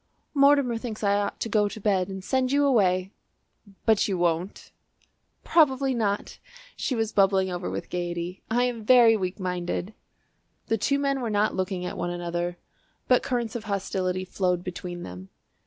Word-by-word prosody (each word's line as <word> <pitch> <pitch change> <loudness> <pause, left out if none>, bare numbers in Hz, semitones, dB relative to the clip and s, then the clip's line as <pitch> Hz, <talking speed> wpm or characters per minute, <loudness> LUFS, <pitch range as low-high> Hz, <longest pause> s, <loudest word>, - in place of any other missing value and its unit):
"Mortimer 280 -4 +4
thinks 225 -3 -6
I 200 0 +3
ought 205 0 -1
to - - -1
go 210 -1 +2
to 220 - -8
bed 195 -3 +1
and 190 -1 -6
send 260 +3 0
you 285 +1 +3
away." 190 -7 +2 0.7
"But 220 -2 +3
you 195 -3 -1
won't?" 175 +2 -1 0.7
"Probably 270 -4 +3
not." 210 -4 -2 0.4
She 260 - -2
was 225 -1 -1
bubbling 195 -1 +3
over 180 0 -3
with - - -5
gaiety. 175 0 -4
"I 240 +2 +2
am 240 -3 -2
very 235 -1 +6
weak 185 -2 -3
minded." 180 +2 -3 0.8
The 225 - +2
two 280 +6 +1
men 275 -1 0
were 235 - -2
not 210 0 +1
looking 185 -1 -2
at - - -5
one 175 0 -1
another, 175 0 -3 0.5
but 250 - +4
currents 245 -3 -2
of 230 -2 -5
hostility 185 -2 -2
flowed 180 -1 -1
between 175 -1 -6
them. 90 +1 -9
200 Hz, 170 wpm, -26 LUFS, 180-235 Hz, 0.8 s, very